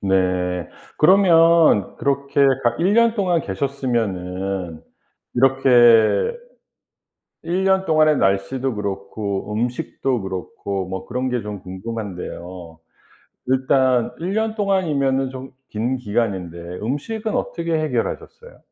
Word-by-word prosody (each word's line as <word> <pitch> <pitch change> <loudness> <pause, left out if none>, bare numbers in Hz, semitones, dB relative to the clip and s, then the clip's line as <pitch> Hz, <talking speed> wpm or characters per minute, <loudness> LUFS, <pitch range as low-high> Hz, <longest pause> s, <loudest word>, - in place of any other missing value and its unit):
네. 90 -2 0 0.3
그러면 165 - +5
그렇게 140 0 -1 0.2
가 120 0 +2
1 185 +5 +2
년 230 0 +4
동안 180 -6 +1
계셨으면은 95 - -3 0.5
이렇게 125 - +4 1.1
1 180 +3 -1
년 190 0 +2
동안의 155 -2 +3
날씨도 100 +7 0
그렇고 100 0 -4
음식도 125 +1 -2
그렇고 95 0 -5
뭐 95 0 -6
그런 125 +1 -2
게 125 -2 -1
좀 105 -2 -7
궁금한데요. 90 -4 -7 0.7
일단 130 -1 +2
1 175 +4 -3
년 220 0 0
동안이면은 145 - 0
좀 130 0 -9 0.2
긴 120 +5 -2
기간인데 100 -7 -2 0.2
음식은 210 - -3
어떻게 170 -1 -2
해결하셨어요? 155 - -4
125 Hz, 230 characters per minute, -21 LUFS, 100-155 Hz, 1.1 s, 그러면